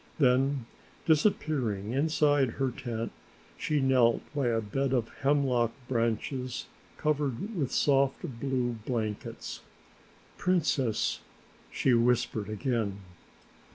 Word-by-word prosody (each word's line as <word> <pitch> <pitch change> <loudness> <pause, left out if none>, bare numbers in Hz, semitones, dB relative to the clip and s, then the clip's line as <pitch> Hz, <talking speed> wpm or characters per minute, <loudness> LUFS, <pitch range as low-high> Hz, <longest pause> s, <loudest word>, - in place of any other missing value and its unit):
Then 135 -2 +3 0.4
disappearing 145 - +1
inside 145 -3 +2
her 135 -2 0
tent, 115 -2 -4 0.4
she 150 - 0
knelt 130 -4 +3
by 140 -4 0
a 115 -1 +2
bed 130 +5 -1
of 120 -3 +1
hemlock 135 -5 +2
branches 125 +1 -1 0.3
covered 150 - -1
with 140 -7 -1
soft 135 -1 +2 0.2
blue 125 -3 -1
blankets. 110 -4 -3 0.8
"Princess," 150 -10 +1 0.5
she 130 - +2
whispered 120 -3 +2
again. 110 -3 -1
130 Hz, 95 wpm, -29 LUFS, 115-140 Hz, 0.8 s, Then